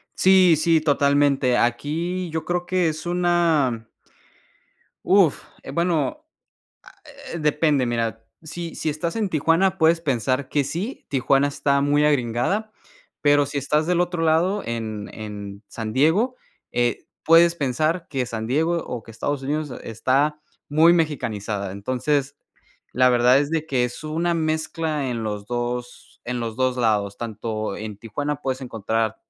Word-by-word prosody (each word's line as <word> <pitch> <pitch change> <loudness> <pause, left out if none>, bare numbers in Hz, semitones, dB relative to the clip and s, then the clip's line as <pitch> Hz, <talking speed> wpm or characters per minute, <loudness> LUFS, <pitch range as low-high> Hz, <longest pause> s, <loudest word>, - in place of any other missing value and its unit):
Sí, 185 -3 +6
sí, 160 0 +3
totalmente. 140 -3 +2
Aquí 165 +9 -1
yo 160 0 -3
creo 175 0 -1
que 180 -2 +1
es 155 +1 -6
una. 170 -9 +1 1.2
Uf, 190 -6 +4 0.2
eh, - - -7
bueno, 175 - -1 0.6
ah, - - -20 0.4
eh 170 - -4
depende. 150 -3 +2
Mira, 115 -1 -2 0.2
sí, 165 +1 -7
si 155 - -2
estás 160 +6 -3
en 215 -3 -1
Tijuana, 170 +4 +2
puedes 165 +1 +3
pensar 130 -2 -1
que 145 - +1
sí, 175 - -5
Tijuana 135 +1 +2
está 140 0 +1
muy 145 +1 +2
agringada, 145 - 0 0.5
pero 145 -1 +4
si 140 +1 -5
estás 150 +3 0
del 175 -1 +2
otro 175 -2 -1
lado 170 +6 +2
en 110 -3 -4
en 105 -1 -8
San 110 -2 -6
Diego, 180 - +2 0.4
eh, 120 -1 0 0.2
puedes 170 +1 +6
pensar 155 +4 -1
que 135 -4 -1
San 110 -1 -5
Diego 160 +7 +1
o 120 -3 -6
que 115 - -12
Estados 135 +5 -3
Unidos 150 0 -2
está 135 +7 0 0.3
muy 160 +4 +5
mexicanizada. 110 - -2
Entonces, 130 +7 -1 0.6
la 125 +1 +4
verdad 125 +1 +5
es 145 +1 -1
de 160 -1 -1
que 130 -5 +1
es 125 +5 -6
una 165 +3 0
mezcla 155 -2 -1
en 115 -2 -3
los 105 -1 -4
2 120 0 -5
en 125 0 -3
los 115 -1 -4
2 130 0 +1
lados. 105 -4 +1
Tanto 110 -2 -4
en 105 -2 -7
Tijuana 145 +7 -3
puedes 130 -1 -2
encontrar 110 -2 -2
145 Hz, 150 wpm, -23 LUFS, 120-165 Hz, 1.2 s, Sí